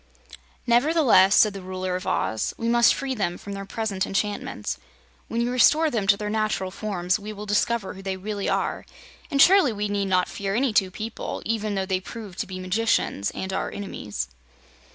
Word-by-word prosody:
"Nevertheless," 240 - +5
said 215 -2 +5
the 195 - -7
Ruler 185 0 -3
of 185 - -5
Oz, 110 -1 -1
"we 230 - -2
must 235 0 +5
free 270 -1 -3
them 190 -7 -2
from 200 - -8
their 195 0 -6
present 200 -2 -2
enchantments. 195 - -2 0.5
When 230 - -1
you 240 +1 0
restore 300 +5 +4
them 215 -5 -1
to 200 0 +5
their 210 - -4
natural 215 -3 -1
forms 185 -2 -1
we 210 +1 -7
will 210 0 -7
discover 210 +1 0
who 195 - -10
they 190 -1 -3
really 200 +1 -3
are, - - -1 0.5
and 280 -4 -1
surely 370 -4 +7
we 210 -1 -2
need 200 -1 -1
not 185 -1 +2
fear 195 0 -3
any 250 -1 +1
two 195 -3 +3
people, 220 +4 -5
even 215 -2 -1
though 190 -1 -1
they 190 -1 0
prove 205 -1 -9
to 215 - -3
be 185 0 -6
magicians 185 - 0
and 190 0 -4
our - - -1
enemies." 105 - -5
205 Hz, 195 wpm, -25 LUFS, 190-230 Hz, 0.5 s, surely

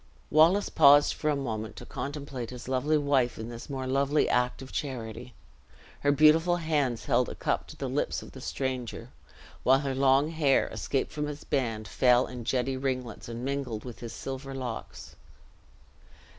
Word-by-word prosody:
Wallace 170 +7 +5
paused 145 +1 +6
for 155 - -2
a 150 - +2
moment, 110 -6 -4
to - - -9
contemplate 140 -4 -5
his 125 -1 -9
lovely 135 +4 +1
wife 140 -4 +1
in 110 +1 -6
this 120 +3 -9
more 135 -2 -4
lovely 140 +3 +2
act 125 +1 0
of 130 - -11
charity. 120 -3 -5 0.6
Her 145 - +2
beautiful 155 +4 +5
hands 150 -8 -1
held - - +2
a - - -7
cup - - -1
to - - -11
the - - -4
lips - - -1
of - - -12
the - - -11
stranger; 125 -3 -4 0.5
while 135 +1 +4
her 135 -2 -2
long 135 +2 +3
hair, 150 -4 +3
escaped 135 - -2
from 150 -1 -3
its 150 0 -7
band, 115 -7 -1
fell 125 +5 +4
in 125 -2 -8
jetty 130 +1 0
ringlets, 130 -4 -3
and 120 +2 -5
mingled 135 -5 -3
with 120 -2 -8
his 115 -1 -7
silver 135 0 -6
locks. 125 -4 -6
135 Hz, 170 wpm, -28 LUFS, 125-145 Hz, 0.6 s, paused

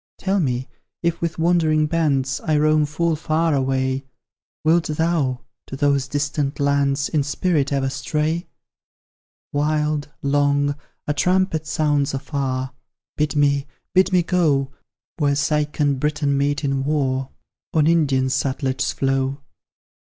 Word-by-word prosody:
Tell 195 +1 0
me, 130 -5 -1 0.4
if 170 0 0
with 170 -1 -2
wandering 160 -2 +3
bands 140 -5 0
I 155 -3 +1
roam 155 0 +3
full 165 +2 0
far 160 +1 0
away, 130 0 0 0.6
Wilt 165 +2 +3
thou 155 -5 0 0.3
to - - -6
those 140 -1 +1
distant 145 0 -2
lands 140 0 +1
In 150 - +1
spirit 145 0 0
ever 135 -1 +1
stray? 150 +5 -2 1.1
Wild, 150 0 0
long, 145 0 +2 0.3
a 150 - 0
trumpet 180 -1 +1
sounds 145 -3 +1
afar; 130 -1 -3 0.4
Bid 150 0 0
me 140 -1 +2 0.3
bid 190 +1 +4
me 180 -2 +3
go 150 -7 +1 0.5
Where 145 -2 +2
Seik 150 0 0
and 140 -2 +2
Briton 145 -1 0
meet 145 +2 0
in 135 -1 0
war, 135 -2 0 0.4
On 155 -2 +3
Indian 150 -5 +3
Sutlej's 130 0 -1
flow. 135 +1 0
145 Hz, 130 wpm, -22 LUFS, 135-155 Hz, 1.1 s, bid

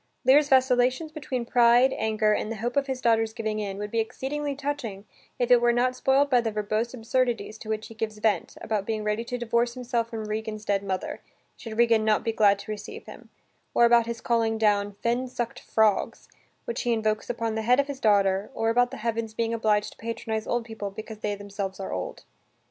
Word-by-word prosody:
Lear's 285 +3 +5
vacillations 260 +3 +3
between 265 -6 -4
pride, 240 +2 +5
anger, 215 -1 +1
and 215 - -2
the - - -3
hope 235 +3 -3
of 280 0 +1
his 260 -1 -3
daughters' 225 -2 +2
giving 220 -2 -3
in, 200 -2 -4
would 210 0 -5
be 230 - 0
exceedingly 280 +5 -3
touching 270 -8 -4 0.3
if 245 0 0
it 245 -1 +7
were 240 0 +4
not 250 +1 +1
spoilt 270 +2 +3
by 250 -3 +3
the 230 - -1
verbose 215 +2 -1
absurdities 240 -1 -1
to 220 - -9
which 215 0 -2
he - - -11
gives 220 -1 -4
vent, 210 0 0
about 210 -3 -2
being 220 -1 -2
ready 210 +2 -1
to 245 +1 -4
divorce 240 0 0
himself 240 -2 -2
from 225 -2 -5
Regan's 215 0 -4
dead 200 -1 +1
mother, 190 -2 -4 0.3
should 220 -2 -8
Regan 230 -2 +4
not 215 -1 +2
be 230 - 0
glad 205 -2 +4
to 205 - -8
receive 210 - -7
him, - - -12 0.5
or 235 - +6
about 235 -1 +5
his 235 -1 -4
calling 225 -2 +1
down 205 -2 +2
"fen 240 +2 0
suck'd 245 -2 -4
frogs" 220 -2 +1 0.4
which 475 - -3
he 240 -2 +1
invokes, 215 -1 -1
upon 230 -2 -2
the 220 - -2
head 245 +4 +3
of 280 - +3
his 280 -2 -6
daughter, 200 -2 +2
or 225 0 +1
about 245 +1 +3
the - - -8
heavens 225 -1 -2
being 230 0 -1
obliged 215 -2 +1
to - - -18
patronize 225 -1 -4
old 240 -1 -1
people 220 -3 -5
because 215 +2 -9
they 210 -1 -2
themselves 200 -1 -5
are 195 - -4
old. 90 0 -5
225 Hz, 215 wpm, -26 LUFS, 215-245 Hz, 0.5 s, it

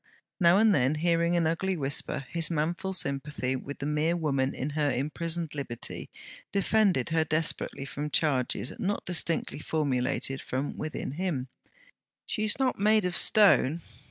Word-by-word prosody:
Now 175 0 +5
and 220 0 +5
then, 130 -1 +2
hearing 170 +2 +1
an 170 - +2
ugly 180 +3 0
whisper, 135 -1 -1
his 165 -2 0
manful 170 +4 -1
sympathy 140 -5 0
with 140 +2 -6
the 140 - -5
mere 150 +3 +1
woman 140 -5 0
in 140 +4 -3
her 150 -1 +1
imprisoned 160 +4 -2
liberty, 135 -5 -5 0.4
defended 200 - +2
her 160 0 +2
desperately 155 -3 0
from 145 +2 -5
charges 135 -4 0
not 200 +2 -2
distinctly 170 -3 0
formulated 135 -3 -1 0.3
within 155 -3 -4
him: 145 -5 -3 0.8
'She's 215 -2 -1
not 260 -5 0
made 215 0 +4
of 180 -1 -1
stone.' 170 -7 +4
160 Hz, 140 wpm, -28 LUFS, 140-175 Hz, 0.8 s, Now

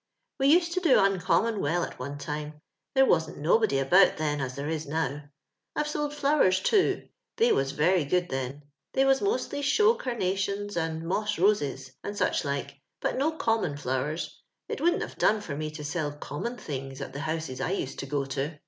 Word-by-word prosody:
*' - - -55
We 270 - +3
used 340 +3 +5
to 365 - +1
do 335 -7 +5
uncommon 195 +3 +2
well 165 +4 +1
at - - -6
one 140 +3 -5
time; 150 +1 -5 0.4
there 270 0 +6
wasn't 160 -8 +1
nobody 165 +3 +3
about 180 +8 +5
then 150 -2 -1
as 130 -1 -3
tliere 145 +3 -3
is 160 -1 -3
now. 150 -1 -2 0.5
I've 300 - 0
sold 295 -1 -2
flowers, 280 -11 +3
too; 390 - +2 0.3
they 465 +1 +4
was 135 +1 +1
very 170 +4 +3
good 180 +4 +1
then; 135 +2 -4 0.3
they 270 - +3
was 270 0 +4
mosUy 405 -8 -1
show 425 +11 +4
carnations 205 - -2
and 160 -1 -2
moss 210 +4 -1
roses, 145 -9 +1
and 205 0 -5
such - - +1
like, 140 -1 -3 0.2
but - - -1
no 310 +4 +1
common 225 - 0
flowers 140 +4 -3
— - - -58
it - - -4
wouldn't 345 +2 +2
have - - -9
done 215 - +4
for 170 -9 -5
me 155 +1 -3
to 150 -1 -8
sell 150 0 -2
common 150 - -5
things 135 - -6
at 135 -1 -6
tho 140 - -5
houses 155 -4 -3
I 135 - -1
used 180 -8 -3
to 135 - -4
goto. 140 +2 -2
160 Hz, 195 wpm, -28 LUFS, 145-220 Hz, 0.5 s, there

